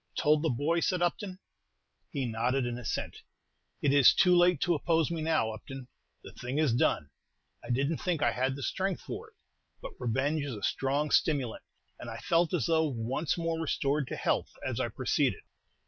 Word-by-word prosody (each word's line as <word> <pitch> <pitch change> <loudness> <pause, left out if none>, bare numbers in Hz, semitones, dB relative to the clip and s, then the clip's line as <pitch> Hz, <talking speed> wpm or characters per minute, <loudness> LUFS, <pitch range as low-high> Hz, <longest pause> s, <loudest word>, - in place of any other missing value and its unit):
"Told 150 0 +3
the 160 - +1
boy?" 145 +7 +1
said 180 +1 +1
Upton. 185 +2 -2 0.7
He 140 -4 -2
nodded 120 +3 0
an 120 0 -3
assent. 115 - -4 0.6
"It 140 - +3
is 140 -3 +7
too 180 0 +5
late 175 -2 +4
to 175 - +3
oppose 165 +1 +1
me 165 -2 -2
now, 155 -9 +1
Upton, 125 +4 -9 0.4
the - - -10
thing 125 +3 -5
is 155 -6 +2
done. 75 - +1 0.5
I - - -10
didn't 140 +6 0
think 170 -5 -1
I - - +3
had 130 +2 -1
strength 185 +6 -2
for - - -6
it; - - -35 0.4
but - - -7
revenge 135 +5 0
is 140 -5 -4
a 100 - -9
strong 140 +3 0
stimulant, 135 -8 +1 0.4
and 120 - -7
I 115 - -6
felt 170 +5 +1
as 170 -9 0
though 160 -1 +2
once 130 +5 -2
more 165 -1 -1
restored 140 -2 0
to - - -4
health, - - 0 0.2
as - - -2
I - - 0
proceeded. - - 0
145 Hz, 185 wpm, -30 LUFS, 125-165 Hz, 0.7 s, is